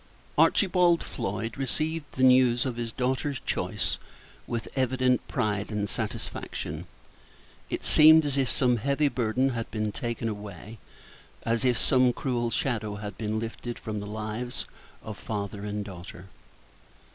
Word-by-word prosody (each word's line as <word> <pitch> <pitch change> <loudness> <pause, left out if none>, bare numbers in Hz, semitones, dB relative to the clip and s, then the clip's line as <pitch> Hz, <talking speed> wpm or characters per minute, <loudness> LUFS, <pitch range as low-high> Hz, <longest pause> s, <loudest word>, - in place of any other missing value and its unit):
Archibald 180 -3 +4
Floyd 110 +5 -4
received 155 +3 -1
the 130 - -1
news 125 -1 +5
of 130 -3 -2
his 115 -1 -3
daughter's 130 +3 -1
choice - - -1 0.5
with 115 -2 -3
evident 130 -1 +2
pride 105 -1 -1
and 105 -1 -1
satisfaction. 80 -4 -4 0.8
It - - -3
seemed 155 0 +8
as 140 -2 0
if 135 -2 +1
some 125 -2 +3
heavy 140 +5 +2
burden 125 +1 +1
had 115 -3 -3
been 110 -1 -2
taken 120 -1 -3
away, 105 0 -7 0.6
as 115 +1 +1
if 125 -2 +3
some 125 -1 +4
cruel 120 -3 -1
shadow 110 -4 -1
had 105 0 -6
been 110 -1 -2
lifted 115 +1 -5
from 105 -1 -4
the 100 - -6
lives 110 +3 -4 0.4
of 110 -2 -7
father 100 -1 -4
and 105 0 -3
daughter. 90 -1 -10
115 Hz, 140 wpm, -28 LUFS, 105-130 Hz, 0.8 s, seemed